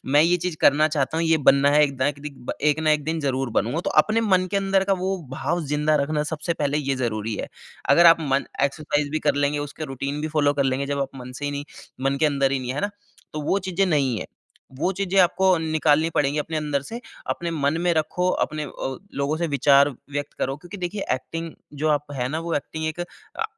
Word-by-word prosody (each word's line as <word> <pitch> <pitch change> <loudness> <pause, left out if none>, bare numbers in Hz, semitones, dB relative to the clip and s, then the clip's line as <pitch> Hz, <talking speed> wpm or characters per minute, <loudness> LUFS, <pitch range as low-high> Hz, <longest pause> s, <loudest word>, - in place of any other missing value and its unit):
मैं 145 +3 +5
ये 175 +2 +4
चीज़ 175 -2 -3
करना 150 +2 +5
चाहता 150 0 -1
हूँ, 165 - +1
ये 160 0 +4
बनना 140 0 +5
है 150 +1 +5
एक 140 -2 -3
दा 130 +1 +1
एक 140 -1 -5
दिक 140 -4 -6
एक 150 0 +3
न 160 - -3
एक 150 -1 +3
दिन 160 0 -1
ज़रूर 135 -2 -1
बनूँगा। 125 - +1
तो - - 0
अपने 220 +1 0
मन 185 -4 +2
के 200 - 0
अंदर 195 -1 +2
का 195 - +1
वो 190 +1 0
भाव 170 +5 -1
ज़िंदा 150 +2 +1
रखना 150 +1 -1
सबसे 160 +2 -2
पहले 145 -1 0
ये 140 -2 -1
ज़रूरी 110 -3 -2
है। - - -5 0.4
अगर 170 +5 +7
आप 165 - +9
मन 140 -2 0 0.2
एक्सरसाइज़ 145 0 0
भी 155 - 0
कर - - +4
लेंगे, 145 +1 +1
उसका 145 +2 -5
रूटीन 140 +2 -4
भी 155 - -2
फ़ॉलो 145 -2 +2
कर 140 -1 +1
लेंगे 135 +1 0
जब 140 0 -2
आप 135 - -3
मन 125 0 -8
से 130 +3 -7
ही 145 - -1
नहीं 145 0 -4 0.4
मन 135 +1 +1
के 155 - +5
अंदर 140 -2 +1
ही 135 - +1
नहीं, 125 0 -3
है 140 - -3
ना, 205 0 -1 0.4
तो 155 - -4
वो 190 +7 +1
चीज़ें 190 +2 +1
नहीं 135 - +1
है। - - -6 0.5
वो 185 - +1
चीज़ें 195 -1 0
आपको 185 +1 +4
निकालनी 155 0 +2
पड़ेंगी 145 +1 +1
अपने 160 +2 -2
अंदर 150 -2 -1
से। 230 +11 -7 0.3
अपने 170 0 -2
मन 155 0 0
में 175 -1 +2
रखो 180 +3 0 0.2
अपने 155 0 -5
अ, 135 -1 -5 0.3
लोगों 150 +3 0
से 170 +1 -1
विचार 140 +1 +5 0.2
व्यक्त 145 0 -4
करो 135 +1 -1
क्योंकि 175 +6 -10
देखिए 185 +2 -4
एक्टिंग 165 +5 -6 0.3
जो 155 - +2
आप 145 -1 0
है 125 -1 -1
ना, 155 +3 -2
वो 170 0 -3
एक्टिंग 160 +2 -3
एक 160 +2 -3
अ, 175 - -7
150 Hz, 240 wpm, -24 LUFS, 140-165 Hz, 0.5 s, आप